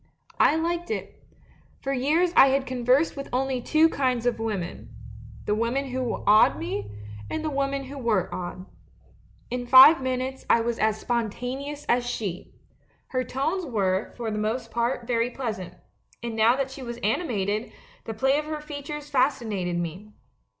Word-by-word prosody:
' - - -28
"I - - +1
liked 340 +2 -1
it. 440 - -5 0.6
For 275 - -2
years 310 +7 +2
I 270 - +8
had 270 0 +1
conversed 255 +4 +2
with 275 -1 -6
only 260 0 0
two 310 +5 +4
kinds 255 -6 0
of 240 -2 +1
women 210 -6 -4 0.3
— - - -16
the 210 - +1
women 240 +5 -1
who 255 -2 -3
awed 210 - +6
me, 105 -1 -4 0.4
and 315 0 -3
the 310 - -1
women 275 0 -1
who 275 +1 -8
were 215 -7 +1
awed. 185 +1 -6 0.9
In 245 0 -3
five 265 +5 +9
min 260 -1 -1
utes 265 +1 -5
I - - +5
was 235 0 -2
as 215 0 +1
spontaneous 250 +5 -3
as 245 +1 +2
she. 210 -7 -4 0.6
Her 255 -1 -1
tones 300 +10 -2
were, 200 - -1
for 230 -2 -3
the 210 - -2
most 230 +2 -2
part, 235 +1 -1
very 235 0 +1
pleasant, 215 -9 -5 0.5
and 235 -1 -4
now 225 +2 +4
that 270 -1 -2
she 265 - -9
was 235 -2 -6
animated, 215 - -1 0.3
the 225 - -5
play 270 +6 +2
of 305 - -5
her 305 0 -4
features 295 0 -7
fascinated 220 -10 0
me. 180 +5 -5
250 Hz, 170 wpm, -26 LUFS, 220-275 Hz, 0.9 s, five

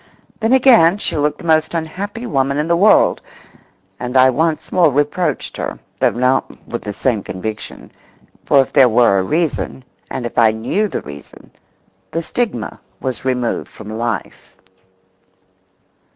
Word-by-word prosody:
Then 225 0 0
again 235 -9 +5
she 205 - -2
looked 150 0 0
the - - -12
most 160 0 +2
unhappy 200 +8 -4
woman 140 - 0
in 150 +2 -1
the 170 - +3
world, 200 +5 +4 0.8
and 125 +1 -2
I 130 0 +6
once 160 +4 -1
more 175 -4 +4
reproached 145 +6 -1
her, - - -4 0.2
though - - +4
not 125 +2 -1
with 120 - -5
the 105 - -5
same 110 +1 -1
conviction, 105 +4 -7 0.5
for 140 - +4
if - - -15
there 135 -3 +6
were 115 -4 +4
a - - 0
reason, 155 - -2 0.3
and 125 - -4
if 120 - -2
I 110 -2 +5
knew 145 - -1
the - - -5
reason, 70 0 -12 0.6
the 165 - -3
stigma 240 +6 -3 0.2
was 130 -1 -4
removed 125 -2 -1
from 105 - -10
life. 115 +1 -4
140 Hz, 150 wpm, -18 LUFS, 120-170 Hz, 0.8 s, I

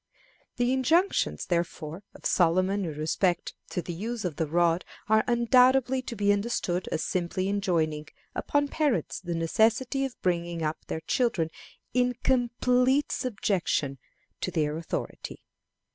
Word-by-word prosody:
The 245 +1 +1
injunctions, 325 +9 +2
therefore, 170 -1 -2
of - - -14
Solomon 185 +3 +2
in 160 - -4
respect 170 +4 0 0.2
to 180 - -3
the 175 - -5
use 220 +5 -4
of 160 -5 -3
the 160 - 0
rod 170 +2 +2 0.2
are 220 0 +4
undoubtedly 250 +2 +4
to 245 - -6
be 205 -1 +3
understood 200 -4 -1
as 155 - -1
simply 185 +1 -1
enjoining 165 -7 0 0.3
upon 290 0 0
parents 280 - 0
the 175 -2 -4
necessity 225 - +2
of 270 -2 -4
bringing 170 -2 -1
up 155 0 -3
their 160 - -3
children 170 -4 0 0.4
in 250 0 +2
complete 250 +2 +2
subjection 185 - -1 0.4
to - - -2
their 150 -1 0
authority. 165 0 -5
195 Hz, 135 wpm, -28 LUFS, 170-245 Hz, 0.4 s, are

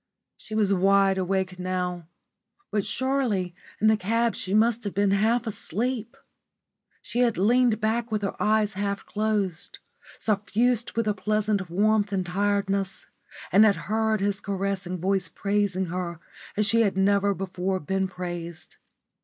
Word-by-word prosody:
She 215 - -8
was 205 -2 +3
wide 195 0 +3
awake 190 0 -1
now. 180 -2 -3 0.6
But 205 -2 +1
surely 245 -10 -1 0.3
in 215 - +1
the 220 0 +6
cab 225 +3 +1
she 185 - -4
must 225 +3 +3
have 205 -3 -4
been 200 0 +2
half 225 +5 +2
asleep. 230 +4 -3 0.9
She 240 - -3
had 240 -3 +2
leaned 235 +3 +3
back 225 +2 -1
with 210 -1 -1
her 195 - -1
eyes 215 0 +2
half 200 +1 -3
closed, 205 -5 -2 0.4
suffused 225 +3 0
with 230 -1 -1
a 210 - +2
pleasant 210 -2 -1
warmth 205 +3 +2
and 190 -2 -1
tiredness, 195 +1 -1 0.5
and 200 +4 +7
had 210 -2 +5
heard 220 -1 0
his 200 0 0
caressing 195 -2 -2
voice 190 +2 0
praising 200 -2 0
her 175 -2 -4 0.4
as 210 - +3
she 230 +3 +3
had 200 -4 +1
never 200 +1 +3
before 185 0 -2
been 190 +4 -1
praised. 175 -2 -7
200 Hz, 145 wpm, -26 LUFS, 190-220 Hz, 0.9 s, and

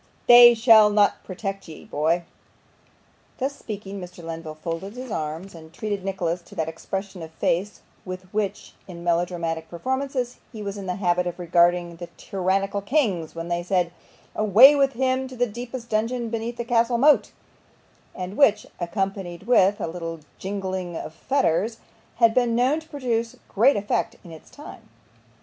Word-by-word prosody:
'They 240 0 +9
shall 225 -2 +7
not 205 -1 +2
protect 195 +1 -5
ye 160 - -11
boy!' 165 +4 0 1.1
Thus 275 +2 -2
speaking, 200 -4 -7
Mr. 180 -1 -10
Lenville 165 -1 -6
folded 165 +5 -5
his 255 -1 -7
arms, 160 +4 -4
and 160 -1 -13
treated 205 +2 -4
Nicholas 180 -3 -2
to 170 - -16
that 160 - -1
expression 190 +3 -5
of 160 - -7
face 185 +5 -1 0.2
with 185 0 -7
which, 210 -2 -3
in 170 -2 -9
melodramatic 170 -1 -1
performances, 260 +5 -3
he 215 -3 -7
was 200 0 -4
in 200 -2 -7
the 180 - -2
habit 180 -2 +1
of 175 - -4
regarding 175 0 +2
the 175 0 -7
tyrannical 195 +1 -1
kings 200 - 0
when 165 0 -5
they 175 0 -1
said, 175 -1 0 0.4
'Away 220 +7 +7
with 275 -1 +2
him 260 +1 0
to 260 - -10
the 245 0 +2
deepest 240 +2 -7
dungeon 230 +2 -1
beneath 230 +1 -3
the 235 - -4
castle 235 0 +2
moat;' 290 +4 +4 0.8
and 185 +2 -6
which, 215 -7 +4
accompanied 180 0 -3
with 205 -3 +4
a - - -2
little 165 -1 -6 0.2
jingling 190 -3 -4
of 155 - -7
fetters, 225 - 0 0.4
had 230 -1 +4
been 240 -2 +2
known 255 +6 +2
to 320 0 -17
produce 235 -5 -2
great 240 +8 +4
effects 205 0 -1
in 170 - -12
its 160 - -13
time. 295 - -12
195 Hz, 165 wpm, -24 LUFS, 175-235 Hz, 1.1 s, They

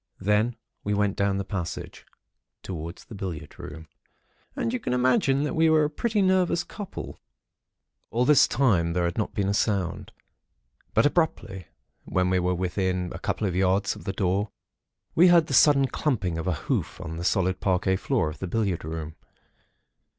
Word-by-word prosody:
Then 105 +4 +1 0.3
we 105 0 0
went 100 -1 +1
down 100 -1 +1
the 100 - -3
passage, 90 -5 -5 0.6
towards 85 -1 -7
the - - -12
billiard 85 -7 -6
room; 80 +1 -9 0.7
and 230 - -1
you 255 - -1
can 215 - -2
imagine 130 +2 +2
that 150 - -2
we 160 0 +3
were 155 -1 +4
a 150 - 0
pretty 215 +5 0
nervous 185 -3 +2
couple. 205 -3 -8 0.9
"All 120 +3 +1
this 145 0 +6
time, 90 -11 +2
there 90 0 0
had 85 +5 -2
not 105 - -2
been 100 -1 0
a 100 - +1
sound; 100 -4 -1 0.8
but 115 - +5
abruptly 145 - 0 0.4
when 90 0 0
we 95 - +3
were 90 0 0
within 90 0 -1
perhaps - - -8
a - - -8
couple 110 - -1
of 90 - -2
yards 95 +2 +1
of - - -12
the 95 - -1
door, 95 +1 0 0.6
we 175 +3 +6
heard 170 -2 +6
the 140 - -5
sudden 140 0 +6
clumping 100 - -1
of 80 - -4
a 90 - +2
hoof - - -2
on 80 -2 -6
the 85 - -4
solid 95 0 +1
parquet 95 0 +1
floor 115 - 0
of 75 0 -6
the 95 - -4
billiard 100 -2 -1
room. 80 0 -5
100 Hz, 180 wpm, -26 LUFS, 90-135 Hz, 0.9 s, this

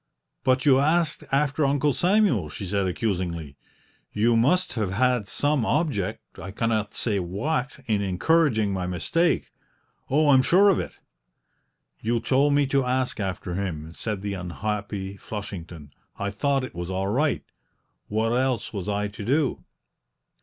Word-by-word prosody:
"But 130 +1 +2
you 135 -2 +6
asked 155 +2 +1
after 145 +2 +1
Uncle 145 +1 +2
Samuel?" 180 - +2
she 75 +7 -6
said 100 0 0
accusingly. 90 -7 -2 0.6
"You 115 +3 +2
must 145 +11 +2
have 105 -6 -1
had 125 -1 +2
some 145 +3 +1
object 135 - -2
I 95 - -7
cannot 110 0 -1
say 105 -4 0
what 125 - -2
in 105 -3 +1
encouraging 110 - +2
my 90 -1 -2
mistake; 165 - 0 0.6
oh, 150 +2 +3
I'm 135 -2 +7
sure 190 +9 +5
of 195 - +3
it!" - - -4 1.1
"You 115 +1 0
told 140 +4 +2
me 145 0 +4
to 135 0 +1
ask 125 -1 -1
after 95 -2 -3
him," 85 -4 -4
said 105 +1 -4
the 100 -1 -2
unhappy 100 +1 -4
Flushington; 90 -8 -7 0.3
"I 100 0 -2
thought 135 +6 0
it 130 - -6
was 85 +1 -5
all 95 +1 -1
right. 115 - +1 0.6
What 110 +2 0
else 125 -2 0
was 100 -1 -4
I 105 0 0
to 105 0 -8
do?" 140 +4 0
110 Hz, 150 wpm, -25 LUFS, 95-140 Hz, 1.1 s, I'm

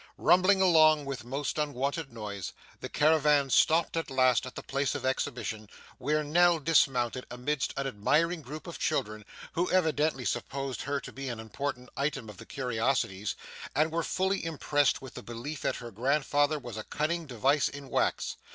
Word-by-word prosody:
Rumbling 185 +2 +4
along 155 -5 +5
with 135 -3 -5
most 135 +5 -3
unwonted 140 +1 -2
noise, 105 -4 -6 0.3
the - - -6
caravan 150 -2 +3
stopped 165 +5 +4
at 165 -2 -2
last 130 -2 +3
at 130 - -10
the - - -6
place 140 0 -1
of - - -4
exhibition, 115 -5 -2 0.3
where 150 +4 +1
Nell 175 +3 +4
dismounted 135 -5 +2
amidst 125 +3 -2
an 135 - -1
admiring 155 +8 +1
group 150 +3 -8
of 170 - -8
children, 110 -8 -1 0.3
who 175 +2 0
evidently 155 -6 +1
supposed 135 +5 -3
her 140 0 -1
to - - -9
be 135 0 -6
an 120 -2 -5
important 125 +3 -4
item 135 -5 -2
of 100 - -16
the - - -12
curiosities, 115 -5 -1 0.4
and 155 +3 +2
were 165 +1 0
fully 190 +4 0
impressed 145 -4 +1
with 130 - -9
the - - -7
belief 120 +6 -6
that - - 0
her 120 -1 -8
grandfather 145 +5 +1
was 120 -6 -8
a 110 - -4
cunning 160 +5 -2
device 135 +4 +2
in 140 -1 -8
wax. - - 0
140 Hz, 170 wpm, -29 LUFS, 125-155 Hz, 0.4 s, along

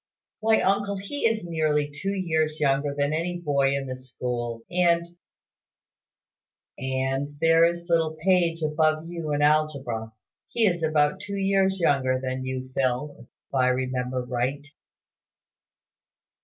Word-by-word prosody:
"Why, 220 0 +3
uncle, 200 +1 +1
he 230 +7 -1
is 225 -3 -1
nearly 155 -3 0
two 150 +7 -4
years 160 -4 0
younger 140 0 +1
than 145 +1 +1
any 175 +3 -1
boy 140 -4 +1
in 140 0 -2
the 130 -1 -4
school; 120 -2 -5
and 170 -1 +2 0.7
" - - -31
"And 135 +2 -2
there 165 +1 +5
is 170 0 -1
little 165 -2 +1
Page 170 -2 +2
above 155 +1 +1
you 170 -3 -4
in 145 0 +1
algebra. 140 -7 +1 0.4
He 230 - +2
is 175 -4 +1
about 150 -2 +2
two 200 -1 -5
years 195 0 +2
younger 135 -5 +2
than 130 0 -3
you, 130 0 -5
Phil, 130 +3 -1
if 115 - -14 0.3
I 130 -1 +3
remember 125 0 -1
right." 130 +4 -2
150 Hz, 140 wpm, -25 LUFS, 130-170 Hz, 0.7 s, there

